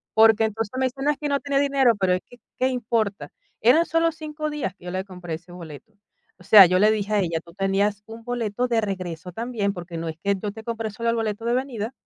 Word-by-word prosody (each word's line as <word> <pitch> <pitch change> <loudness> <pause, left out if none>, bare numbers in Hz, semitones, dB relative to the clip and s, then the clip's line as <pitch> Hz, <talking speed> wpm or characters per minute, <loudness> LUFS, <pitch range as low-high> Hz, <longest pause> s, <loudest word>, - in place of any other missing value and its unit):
Porque, 220 0 +6
entonces, 220 -1 -3
me 260 - +2
dice: 270 +2 -8
"No, 295 - +3
es 290 - -4
que 295 -1 -2
no 280 0 +1
tenía 280 -1 0
dinero". 275 -4 +3
"Pero 185 -1 +2
es 185 - -1
que, 245 - -16 0.2
qué 255 - +2
importa". 225 -5 -1 0.3
Eran 300 +10 +5
solo 330 0 +2
5 305 -1 -5
días 295 -11 -3
que 180 - -18
yo 180 - -5
le 185 +1 -3
compré 180 -4 -6
ese 175 +2 -13
boleto. 175 +5 -11 0.5
O - - -16
sea, 200 -1 +9
yo 185 +1 +2
le 210 +1 +5
dije 215 -1 -1
a 205 - +3
ella: 170 -3 0
"Tú 170 - -15
tenías 200 +1 0
un 225 +1 -10
boleto 245 0 -2
de 230 -2 +1
regreso 180 -3 -5
también, 225 -3 -2
porque 175 -2 -7
no 165 0 -4
es 160 - -6
que 200 0 +2
yo 205 -2 -3
te 220 +1 -10
compre 225 -1 -3
solo 230 +2 -2
el - - -1
boleto 225 0 -2
de 235 - +1
venida". 250 -3 -2
220 Hz, 255 wpm, -24 LUFS, 190-245 Hz, 0.5 s, sea